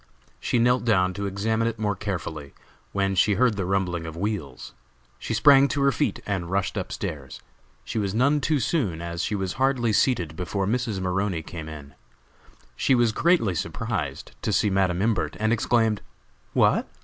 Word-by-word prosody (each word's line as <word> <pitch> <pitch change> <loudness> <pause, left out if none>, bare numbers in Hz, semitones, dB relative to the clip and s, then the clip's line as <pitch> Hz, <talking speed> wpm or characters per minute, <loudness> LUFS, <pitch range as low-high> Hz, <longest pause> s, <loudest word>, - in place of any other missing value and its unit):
She - - 0
knelt 125 +2 +3
down 95 -5 +2
to 100 +2 -3
examine 110 +4 0
it 115 -1 -3
more 105 -2 -1
carefully, 80 -8 -5 0.4
when 100 -1 0
she 100 +2 +3
heard 120 +1 +3
the 95 -3 -2
rumbling 90 -4 -1
of 80 0 -7
wheels. 95 -9 -4 0.5
She 115 - -3
sprang 140 +3 +6
to 140 - -2
her 140 - +4
feet 145 - -1
and 95 -4 -2
rushed 95 +2 -1
up 95 -3 -4
stairs. 75 -9 -5 0.4
She - - -3
was 100 -1 -2
none 140 +5 +3
too 150 +1 +1
soon, 110 - 0
as 85 0 -4
she 105 +4 -1
was 95 -2 -2
hardly 125 -4 +2
seated 90 - +1
before 95 +3 -2
Mrs. 115 -1 -1
Maroney 95 -2 -1
came 80 -1 -7
in. 70 -3 -10 0.8
She 130 - +2
was 120 -2 +3
greatly 165 - +2
surprised 80 - -4
to - - -1
see 105 - +2
Madam 95 -1 +1
Imbert, 110 -4 0
and 110 +1 +2
exclaimed: 115 -2 +1 0.5
"What! - - +3
100 Hz, 175 wpm, -25 LUFS, 90-115 Hz, 0.8 s, sprang